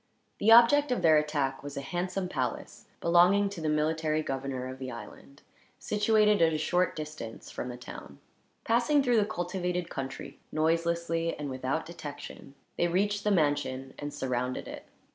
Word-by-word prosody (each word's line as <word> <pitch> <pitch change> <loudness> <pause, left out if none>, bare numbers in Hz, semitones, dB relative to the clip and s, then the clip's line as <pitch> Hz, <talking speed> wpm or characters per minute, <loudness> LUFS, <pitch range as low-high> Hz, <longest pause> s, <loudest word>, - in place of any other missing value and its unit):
The 220 - +4
object 255 +5 +7
of 250 - 0
their 160 -2 +6
attack 145 -3 -1
was 145 0 -8
a - - -2
handsome 180 +5 -3
palace, 130 -8 -4
belonging 180 +4 +4
to 195 -4 -7
the 155 - 0
military 155 0 0
governor 135 -2 -3
of 130 0 -8
the 130 -1 -5
island, 120 +4 -11 0.3
situated 210 -1 +2
at 165 -1 +5
a - - 0
short 180 +3 +1
distance 150 -7 -7
from 125 - -5
the 125 - -7
town. 125 - -10 0.5
Passing 245 +5 +3
through 245 -3 +3
the 210 - +4
cultivated 180 -3 -3
country, 135 0 -6
noiselessly 165 +1 0
and 145 -2 -5
without 130 +4 -2
detection, 145 -4 -9 0.2
they 175 - +2
reached 200 +4 0
the 210 - +1
mansion 145 -7 0
and 145 0 -4
surrounded 130 -3 -3
it. - - -9
160 Hz, 160 wpm, -29 LUFS, 140-185 Hz, 0.5 s, object